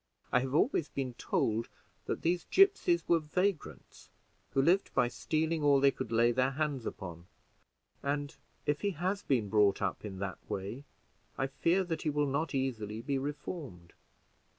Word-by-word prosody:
I 125 - +5
have 130 +2 -2
always 165 - +2
been 130 -3 -3
told 115 +1 0 0.4
that - - -3
these 175 +1 +1
gipsies 385 -3 +4
were 170 - +4
vagrants, 155 - -3 0.4
who 135 - +2
lived 180 +6 +3
by 125 -2 +3
stealing 160 +4 -1
all 145 -1 +5
they 140 0 +5
could 115 - -6
lay 115 +1 +4
their 130 +2 +2
hands 140 -3 -2
upon; 85 -2 -7 0.7
and, 145 0 -2 0.3
if 145 0 0
he 200 -3 -1
has 190 +3 0
been 120 - +1
brought 105 -1 +3
up 100 -2 -2
in 100 -3 -6
that 95 -1 -4
way, 100 +9 -4 0.5
I 135 - +1
fear 165 +8 +1
that 170 -3 -3
he 155 - 0
will 150 0 +1
not 140 +2 -1
easily 115 -5 -2
be 140 0 0
reformed. 140 - -6
140 Hz, 165 wpm, -32 LUFS, 115-160 Hz, 0.7 s, I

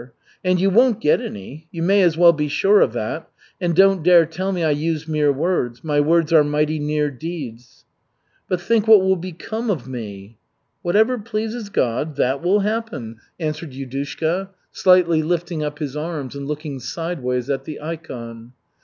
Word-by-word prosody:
And 185 -1 +2
you 195 +2 +2
won't 235 +2 +4
get 150 - +2
any 135 +11 -8
you 165 -1 -5
may 195 +3 +4
as 170 -3 +3
well 170 0 +7
be 150 -1 -1
sure 195 +8 +3
of 120 - +2
it. 120 +8 -3 0.4
And 175 -2 0
don't 195 0 +5
dare 170 0 +6
tell 180 +5 -3
me 180 -3 -1
I 155 - +2
use 155 +1 -2
mere 150 -2 +2
words. 140 -5 -1
My 150 -2 +1
words 165 +2 +2
are 155 -2 +7
mighty 150 +1 0
near 150 0 0
deeds." 130 -5 -8 0.6
"But 180 -2 -1
think 220 +4 +1
what 215 -3 +8
will 190 0 +3
become 185 +6 -5
of 145 - -2
me." 105 -4 -8 0.4
"Whatever 220 +8 +2
pleases 220 0 -4
God, 135 -1 -1
that 135 +1 0
will 190 +4 +2
happen," 210 - -3 0.2
answered 155 -2 -4
Yudushka, 140 +8 -3 0.2
slightly 180 -3 +4
lifting 170 0 -2
up 150 0 -4
his 145 -2 -5
arms 150 -3 -4
and 140 -1 -6
looking 150 -2 -5
sideways 125 -3 -3
at 135 -1 -2
the 155 - -7
ikon. 125 -7 -8
160 Hz, 170 wpm, -21 LUFS, 140-180 Hz, 0.6 s, what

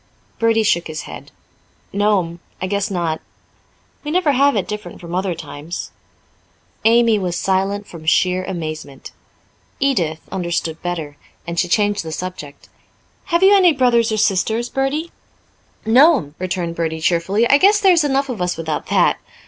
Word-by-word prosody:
Bertie 225 -1 +3
shook 175 -5 +1
his 155 -1 -6
head. - - -10 0.6
"No'm, 195 -4 +1 0.2
I - - -2
guess 200 +2 -1
not. 170 -4 -2 0.8
We 295 - -5
never 335 -2 +2
have 280 0 +3
it 200 - -1
different 210 0 -7
from 170 -1 -9
other 185 -1 -1
times." 155 +3 -7 0.9
Amy 230 -1 +4
was 180 -2 -2
silent 195 +2 0
from 160 -2 -11
sheer 180 +3 +2
amazement. 155 -6 -6 0.7
Edith 170 - 0
understood 170 -3 -3
better, 160 -5 -4 0.3
and 170 0 -3
she 180 - +1
changed 205 +2 +1
the 160 - -6
subject. 155 -4 -7 0.6
"Have 345 -1 +1
you 390 +1 +7
any 365 -4 +5
brothers 240 -4 +2
or 215 - 0
sisters, 220 +3 +1
Bertie?" 285 +5 -2 0.7
"No'm," 245 - +4
returned 180 -2 -3
Bertie 160 -1 -2
cheerfully. 175 +8 +1
"I 280 - +5
guess 410 +4 +5
there's 365 -6 +4
enough 275 -1 +1
of 240 -8 -5
us 180 0 -1
without 160 -2 -3
that. - - +2
195 Hz, 150 wpm, -19 LUFS, 170-240 Hz, 0.9 s, you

